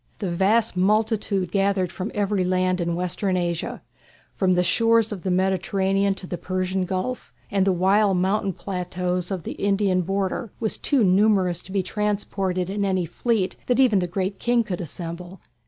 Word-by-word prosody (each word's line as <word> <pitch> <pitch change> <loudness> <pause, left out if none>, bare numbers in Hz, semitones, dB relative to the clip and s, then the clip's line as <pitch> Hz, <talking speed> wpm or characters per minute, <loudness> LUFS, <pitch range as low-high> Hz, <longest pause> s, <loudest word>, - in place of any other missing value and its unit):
The 195 -4 -3
vast 205 +5 +2
multitude 205 -1 +1
gathered 195 -2 +1
from 185 +3 -4
every 205 -2 +1
land 185 0 +1
in 170 0 -1
Western 180 +2 -1
Asia, 170 -2 -3 0.5
from 185 -2 +2
the 180 - +3
shores 225 +4 +3
of 200 -4 -5
the 190 - -2
Mediterranean 190 +1 +1
to 190 - -8
the 175 -1 -5
Persian 185 0 -1
Gulf 190 +7 -3 0.2
and 195 -1 +2
the - - +5
wild 190 +2 +3
mountain 195 +1 0
plateaux 180 -1 -3
of 190 -4 -3
the - - -5
Indian 195 -2 +1
border, 195 +4 -2
was 220 -2 -1
too 275 -6 +2
numerous 190 -2 +3
to 190 - -13
be 195 -1 0
transported 195 -2 -2
in 200 +2 -2
any 185 -3 +1
fleet 195 +2 -1
that 250 +1 +2
even 240 -7 +5
the 180 - -1
Great 190 +2 -3
King 240 -1 +2
could 185 -5 -4
assemble. 175 +3 -7
190 Hz, 170 wpm, -24 LUFS, 180-205 Hz, 0.5 s, the